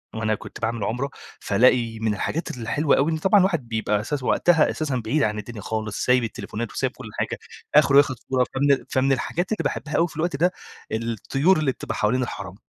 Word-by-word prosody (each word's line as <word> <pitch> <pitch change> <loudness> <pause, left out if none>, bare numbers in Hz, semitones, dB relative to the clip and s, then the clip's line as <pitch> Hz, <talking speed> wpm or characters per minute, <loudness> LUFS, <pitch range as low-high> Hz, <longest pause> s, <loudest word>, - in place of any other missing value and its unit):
وأنا 110 -1 0
كنت - - -11
باعمل 115 -1 -1
عُمرة، 125 +7 -2 0.3
فالاقي 120 -2 +2
من 110 -1 0
الحاجات 155 - -3
الحلوة 140 +6 +1
أوي 145 +4 +2
إن 160 - 0
طبعًا 190 +6 +4
الواحد 170 -9 +1
بيبقى 110 -2 0
أساس 135 +5 -3
وقتها 160 +4 +3
أساسًا 150 -4 -2
بعيد 140 +6 +1
عن 105 -2 0
الدنيا 105 +1 -8
خالص، 110 0 -3
سايب 125 -1 +4
التليفونات 115 0 -5
وسايب - - -1
كل - - -9
حاجة. - - -2 0.4
آخره 145 -2 +6
ياخد 140 -2 +5
صورة 130 -1 +2
فمن 140 0 +2
فمن 135 +1 +2
الحاجات 165 - -1
اللي 220 - -1
باحبها 155 -1 -3
أوي 170 - +3
في - - -14
الوقت 170 +2 -1
ده، 175 +6 +2 0.4
الطيور 115 - +1
اللي 150 -4 +1
بتبقى - - -6
حوالين 125 +5 +1
الحَرَم. 95 -6 -6
130 Hz, 200 wpm, -23 LUFS, 110-150 Hz, 0.4 s, آخره